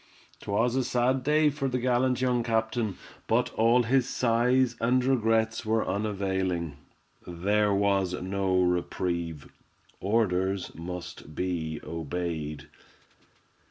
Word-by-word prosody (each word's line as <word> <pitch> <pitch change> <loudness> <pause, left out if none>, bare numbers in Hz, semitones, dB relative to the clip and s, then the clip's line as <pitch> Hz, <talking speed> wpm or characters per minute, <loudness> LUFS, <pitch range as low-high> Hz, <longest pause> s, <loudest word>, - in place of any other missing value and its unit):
'Twas 115 +5 0
a 130 - +2
sad 125 +2 +1
day 150 +2 +3
for 140 -1 -2
the 125 -1 -1
gallant 125 +1 +1
young 125 -2 +2
captain, 110 -3 -1 0.3
but - - +1
all 115 +2 +4
his 130 +2 +2
sighs 125 +1 +2
and 125 +2 +2
regrets 115 -3 +1
were 110 0 0
unavailing. 95 -6 -1 0.5
There 100 +4 +1
was 100 -2 +1
no 95 0 0
reprieve—orders 90 +3 -2
must 85 -2 -8
be 80 -4 -2
obeyed. 80 -3 -4
105 Hz, 105 wpm, -28 LUFS, 90-120 Hz, 0.5 s, all